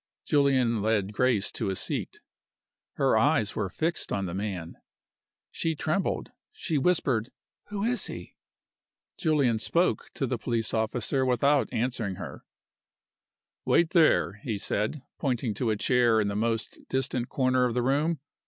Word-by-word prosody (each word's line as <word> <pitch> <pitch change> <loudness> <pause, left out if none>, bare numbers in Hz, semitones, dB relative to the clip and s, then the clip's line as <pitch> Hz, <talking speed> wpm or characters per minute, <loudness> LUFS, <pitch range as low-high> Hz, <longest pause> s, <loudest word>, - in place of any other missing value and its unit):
Julian 130 -6 +3
led 105 -2 0
Grace 115 -3 +2
to - - -2
a 95 - -1
seat. - - -3 0.7
Her - - +2
eyes 110 -2 +2
were 100 -3 -1
fixed 165 - -2
on 100 -1 -1
the 85 - -5
man. 95 -4 -4 0.7
She 165 -1 -1
trembled 155 +6 -1 0.2
she 170 - -2
whispered, 135 -8 +1 0.4
"Who 205 -1 -4
is 245 +2 0
he?" - - -8 0.8
Julian 140 -8 +2
spoke 170 +10 +1
to 135 - -1
the 125 -2 -2
police 115 -1 -1
officer 115 +4 0
without 135 +3 +2
answering 115 -4 -1
her. - - -8 1.2
"Wait 170 0 +3
there," 100 - +3
he 110 -4 -3
said, 105 +8 -2 0.2
pointing 125 -5 -1
to 115 +3 -1
a 110 - +2
chair 120 -1 +3
in 105 -1 +1
the 100 - -3
most 115 +1 -1
distant 130 -2 -1
corner 130 -1 +2
of 120 -1 -1
the 125 - +1
room. 145 +5 +1
125 Hz, 145 wpm, -27 LUFS, 110-140 Hz, 1.2 s, Julian